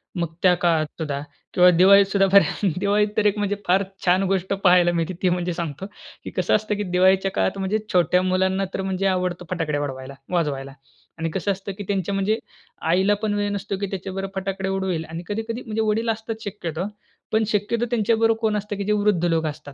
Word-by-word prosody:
मग 170 -2 -2
त्या 180 -1 +6
काळात 165 -3 +3
सुद्धा 145 -3 -2 0.3
किंवा 180 0 +6
दिवाळीत 200 +2 +7
सुद्धा 195 0 +2
बऱ्या 200 0 +4
दिवाळीत 205 +1 +2
तर 215 - +2
एक 210 0 +3
म्हणजे 205 0 0
फार 190 +2 +4 0.2
छान 185 +1 +4
गोष्ट 190 0 0
पाहायला 180 -3 +4
मिळते, 170 +1 -1
ती 185 - +3
म्हणजे 175 0 -1
सांगतो. 165 0 -5 0.4
की - - -6
कसं - - +2
असतं 215 0 0
की 205 - -2
दिवाळीच्या 190 +1 +3
काळात 95 - 0
म्हणजे 195 +3 0
छोट्या 180 0 +3
मुलांना 190 +1 +1
तर 195 - -2
म्हणजे 190 0 -2
आवडतो 180 -1 -3
फटाकड्या 155 -5 -1
उडवायला 130 -1 -6 0.2
वाजवायला 140 -5 -1 0.5
आणि 165 0 -1
कसं 190 +4 -1
असतं 195 +1 -5
की 205 - -5
त्यांच्या 200 -1 -1
म्हणजे 205 +3 +1 0.5
आईला 190 +4 +3
पण 215 -1 +1
वेळ 205 0 0
नसतो 200 -1 -3
की 200 - -1
त्याच्याबरोबर 195 0 -4
फटाकडे 190 0 -3
उडवेल 190 -4 -2
आणि 165 +2 -6
कधी-कधी 225 +3 -4
म्हणजे 220 0 -2
वडील 220 +2 0
असतात 220 0 -3
शक्यतो. 175 -5 -4 0.5
पण 220 0 +2
शक्यतो 220 +3 0
त्यांच्याबरोबर 225 -1 +2
कोण 220 -2 +1
असतं 210 0 -4
की 200 - -2
जे 205 - -1
वृद्ध 205 -4 +2
लोकं 160 -2 +1
असतात 145 -1 -10
190 Hz, 200 wpm, -23 LUFS, 175-205 Hz, 0.5 s, दिवाळीत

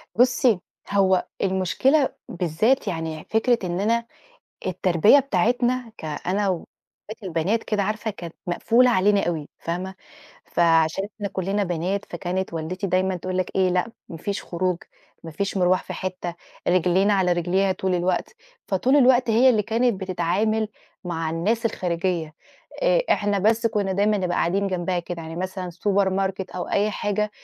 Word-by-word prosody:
بُصي، 245 -4 +4 0.3
هو 190 -2 +3 0.2
المشكلة 190 - +2 0.2
بالذات 180 - +1
يعني 160 -2 -4
فكرة 230 +2 +2
إن 175 0 -2
أنا 230 +3 +1 0.6
التربية 185 - +4
بتاعتنا، 245 +1 0
كأنا 180 +6 -2
واخواتي 205 +4 -8
البنات 185 +6 0
كده 210 -2 0
عارفة 215 +2 -2
كانت 170 -4 -9
مقفولة 235 +8 +3
علينا 205 -2 +3
أوي 160 -4 -3
فاهمة؟ 180 +3 -4 0.5
فعشان 165 +2 +2
إحنا 205 -2 -4
كُلِّنا 195 +2 -1
بنات، 180 +3 -2
فكانت 180 +2 -3
والدتي 180 +5 -3
دايمًا 185 +1 +1
تقول 185 +1 -3
لك 185 - -1
إيه 190 -1 +3
لأ 180 +5 0 0.2
ما 165 - -7
فيش 200 +5 -4
خروج 180 0 -1 0.5
ما 165 - -6
فيش 195 +5 -3
مرْواح 185 0 +3
في - - -6
حتّة 185 -2 -4 0.3
رجلينا 185 +3 +3
على 185 -2 +2
رجليها 185 +3 +1
طول 185 0 -1
الوقت، 180 - -1 0.3
فطول 245 +9 +2
الوقت 250 -3 +5
هي 240 +4 +5
اللي 215 -4 +2
كانت 230 -1 0
بتتعامل 195 +4 0 0.4
مع 165 -2 -2
الناس 215 +8 0
الخارجية، 170 -5 -2 0.5
آآ، - - +4
إحنا 205 -1 +2
بس 220 +4 +2
كُنّا 205 -4 0
دايمًا 205 +2 +2
نبقى 180 -2 -1
قاعدين 195 +4 +1
جنبها 180 -1 -1
كده 170 -1 -5
يعني 160 +1 -7
مثلًا 185 0 -4
Supermarket 190 0 0
أو 180 - -4
أي 210 +1 +1
حاجة 210 +1 -1
190 Hz, 150 wpm, -24 LUFS, 175-215 Hz, 0.6 s, الوقت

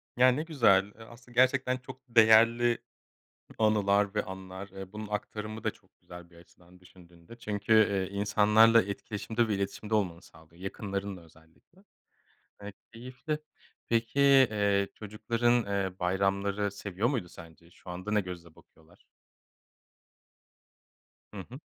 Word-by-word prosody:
Ya, 125 +1 +5
ne 150 +5 -2
güzel. 115 - +3
Eee, 110 +2 -15
aslında 120 +1 -16
gerçekten 130 0 +3
çok 130 +1 -12
değerli 115 +1 +5 0.8
anılar 105 -1 +2
ve 105 - +1
anlar. 95 +1 -9
Eee, 95 -1 -10
bunun 105 0 -6
aktarımı 105 +1 -5
da - - 0
çok - - -28
güzel 90 -1 -12
bir 85 - -21
açıdan 90 +1 -20
düşündüğünde. 90 +2 -17
Çünkü, 105 0 -1
eee, 100 -3 +3
insanlarla 105 +3 +5
etkileşimde 105 +3 -3
ve 105 - 0
iletişimde 100 +2 -4
olmanı 90 -5 0
sağlıyor, 80 +2 -19
yakınlarınla 100 -1 -5
özellikle. 80 - -24 0.8
Eee, 100 0 -8 0.2
keyifli. 125 +6 -5 0.5
Peki, 115 +3 0
eee, 105 -8 +4
çocukların, 115 +2 0
eee, 95 -2 -3
bayramları 100 +2 0
seviyor 100 +2 -3
muydu 115 -11 -2
sence? 85 0 -15
Şu 90 - -15
anda 90 +4 -6
ne 105 -1 +2
gözle 85 -3 -10
bakıyorlar? 80 +2 -23 2.3
Hı 105 - -7
hı. 130 +3 -10
105 Hz, 130 wpm, -29 LUFS, 95-115 Hz, 2.3 s, Ya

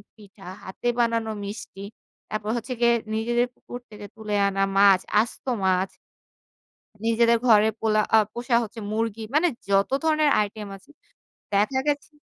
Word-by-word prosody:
পিঠা 200 -2 -16 0.2
হাতে 190 +5 -6
বানানো 230 -1 +1
মিষ্টি, 200 -1 -8 0.5
তারপর 215 0 -4
হচ্ছে 250 +3 -4
গিয়ে 235 0 +5 0.2
নিজেদের 240 +2 +1
পুকুর 245 - -10
থেকে 210 -1 -10
তুলে 215 -1 -5
আনা 195 0 0
মাছ, 195 -2 +6 0.2
আস্ত 235 - -7 0.2
মাছ। 185 0 +2 1.2
নিজেদের 230 0 +3
ঘরে 215 -1 +6
পোলা 215 -1 +2 0.3
পোষা 240 0 0
হচ্ছে 225 +1 -7
মুরগি 225 0 -2
মানে 340 +3 +4 0.2
যত 195 +3 +2
ধরনের 310 -2 +3
আইটেম 210 0 -4
আছে 195 +9 -21 0.6
দেখা 210 +7 +2
গেছে 290 +1 -2
220 Hz, 135 wpm, -24 LUFS, 205-235 Hz, 1.2 s, মাছ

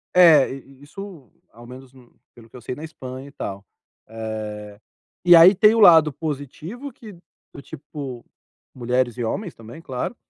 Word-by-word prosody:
É, 165 -6 +6
isso, 140 - -12 0.2
ao 120 +1 -15
menos 130 +1 -13 0.4
pelo 115 -1 -17
que - - -19
eu - - -13
sei, 120 - -6
na 150 - -10
Espanha 130 -4 -9
e - - -14
tal. 100 -7 -7 0.5
Eh, 105 -2 -7 0.5
e 175 -1 +8
aí 170 +4 +8
tem 210 +4 +4
o - - +1
lado 165 -6 +7
positivo, 155 - -7
que, 215 -3 -13 0.4
do 140 - -10
tipo, 140 -4 -9 0.5
mulheres 125 -1 -1
e 120 - -3
homens 175 - -4
também, 115 +6 -12
claro, 130 - -5
135 Hz, 155 wpm, -22 LUFS, 120-165 Hz, 0.5 s, e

